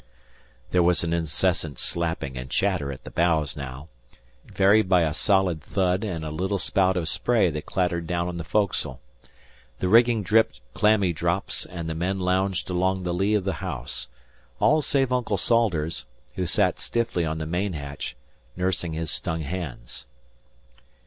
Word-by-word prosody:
There 90 Hz, -, +4 dB
was 85 Hz, 0 st, +3 dB
an 85 Hz, 0 st, -1 dB
incessant 80 Hz, -1 st, 0 dB
slapping 80 Hz, -6 st, -2 dB
and 65 Hz, 0 st, -6 dB
chatter 90 Hz, -7 st, 0 dB
at 65 Hz, -, -9 dB
the -, -, -9 dB
bows 80 Hz, -5 st, +1 dB
now, 70 Hz, +1 st, -7 dB, 0.6 s
varied 100 Hz, +1 st, +4 dB
by 90 Hz, -2 st, +5 dB
a 80 Hz, -2 st, +1 dB
solid 95 Hz, -3 st, +2 dB
thud 95 Hz, +4 st, 0 dB
and 85 Hz, -7 st, -3 dB
a 75 Hz, -, -4 dB
little 95 Hz, +6 st, -1 dB
spout 95 Hz, -1 st, +2 dB
of 85 Hz, -3 st, -1 dB
spray 110 Hz, 0 st, +2 dB
that 75 Hz, +2 st, -6 dB
clattered 85 Hz, -3 st, -1 dB
down 85 Hz, 0 st, -1 dB
on 90 Hz, -1 st, -4 dB
the 85 Hz, -, -4 dB
foc'sle. 100 Hz, +3 st, 0 dB, 0.8 s
The 95 Hz, -, -1 dB
rigging 115 Hz, +1 st, +5 dB
dripped 110 Hz, +3 st, +3 dB
clammy 100 Hz, -2 st, +3 dB
drops, 85 Hz, +4 st, -1 dB
and 85 Hz, -2 st, -6 dB
the 80 Hz, -, -2 dB
men 90 Hz, +4 st, -1 dB
lounged 95 Hz, 0 st, 0 dB
along 95 Hz, +1 st, +1 dB
the 90 Hz, -1 st, -1 dB
lee 100 Hz, +4 st, +2 dB
of 105 Hz, -, +1 dB
the 95 Hz, 0 st, -1 dB
house 65 Hz, -6 st, -5 dB, 0.5 s
all 155 Hz, +1 st, +4 dB
save 135 Hz, -3 st, +1 dB
Uncle 120 Hz, -5 st, 0 dB
Salters, 90 Hz, -8 st, +1 dB, 0.3 s
who 90 Hz, -1 st, -2 dB
sat -, -, +1 dB
stiffly 115 Hz, -7 st, -1 dB
on 80 Hz, -1 st, -2 dB
the 80 Hz, -, -3 dB
main 90 Hz, +4 st, -1 dB
hatch 70 Hz, -2 st, -6 dB, 0.4 s
nursing 90 Hz, -2 st, -1 dB
his 80 Hz, -1 st, -3 dB
stung 80 Hz, 0 st, -1 dB
hands. 70 Hz, -8 st, -6 dB
90 Hz, 165 wpm, -25 LUFS, 80-95 Hz, 0.8 s, by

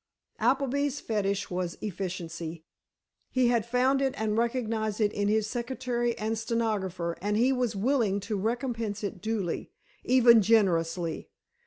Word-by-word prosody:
Appleby's 275 Hz, +3 st, +1 dB
fetish 200 Hz, -3 st, -1 dB
was 180 Hz, -1 st, -2 dB
efficiency. 170 Hz, -4 st, -5 dB, 0.7 s
He 255 Hz, -2 st, +2 dB
had 235 Hz, -2 st, +1 dB
found 255 Hz, +3 st, +2 dB
it 270 Hz, -1 st, 0 dB
and 215 Hz, -1 st, 0 dB
recognized 225 Hz, -2 st, -1 dB
it 210 Hz, -1 st, +2 dB
in 205 Hz, 0 st, 0 dB
his 215 Hz, 0 st, +2 dB
secretary 240 Hz, +1 st, -2 dB
and 220 Hz, +1 st, -1 dB
stenographer 200 Hz, -7 st, -2 dB
and 205 Hz, +2 st, 0 dB
he 250 Hz, +4 st, +3 dB
was 245 Hz, -4 st, -1 dB
willing 215 Hz, -2 st, +1 dB
to 210 Hz, +2 st, -3 dB
recompense 225 Hz, 0 st, -2 dB
it 200 Hz, -2 st, -4 dB
duly, 210 Hz, -5 st, -2 dB, 0.3 s
even 240 Hz, -3 st, +6 dB
generously. 175 Hz, -6 st, +1 dB
220 Hz, 135 wpm, -28 LUFS, 195-240 Hz, 0.7 s, even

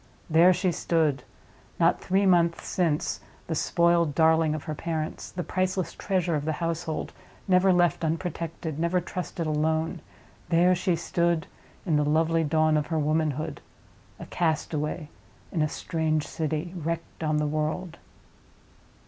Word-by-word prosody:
There 170 Hz, +3 st, +7 dB
she 180 Hz, 0 st, +1 dB
stood—not 160 Hz, -4 st, -1 dB
three 195 Hz, +2 st, +1 dB
months 170 Hz, -2 st, +3 dB
since 165 Hz, -5 st, 0 dB, 0.3 s
the 165 Hz, -, -3 dB
spoiled 170 Hz, -1 st, +2 dB
darling 160 Hz, -1 st, +4 dB
of 155 Hz, -, -5 dB
her 155 Hz, -, -4 dB
parents; 160 Hz, 0 st, -4 dB
the 180 Hz, -, -4 dB
priceless 185 Hz, 0 st, -1 dB
treasure 180 Hz, -3 st, -1 dB
of 150 Hz, -2 st, 0 dB
the 155 Hz, +1 st, -1 dB
household, 165 Hz, -2 st, -3 dB, 0.3 s
never 185 Hz, 0 st, +4 dB
left 175 Hz, -1 st, +2 dB
unprotected, 165 Hz, -1 st, -3 dB
never 170 Hz, +2 st, +2 dB
trusted 175 Hz, -1 st, -4 dB
alone—there 160 Hz, +3 st, 0 dB
she 180 Hz, 0 st, +1 dB
stood 170 Hz, 0 st, 0 dB, 0.4 s
in 160 Hz, -5 st, +2 dB
the 150 Hz, -, +2 dB
lovely 160 Hz, +2 st, +2 dB
dawn 155 Hz, 0 st, +2 dB
of 150 Hz, -, -1 dB
her 160 Hz, -, -1 dB
womanhood, 155 Hz, 0 st, -1 dB, 0.6 s
a -, -, -7 dB
castaway 155 Hz, -1 st, -1 dB, 0.4 s
in 165 Hz, -, 0 dB
a 155 Hz, -, +2 dB
strange 155 Hz, -1 st, -1 dB
city, 160 Hz, +2 st, -3 dB
wrecked 165 Hz, 0 st, -4 dB
on 155 Hz, -1 st, +1 dB
the 150 Hz, -, +1 dB
world! 155 Hz, +3 st, -2 dB
165 Hz, 135 wpm, -27 LUFS, 155-175 Hz, 0.6 s, There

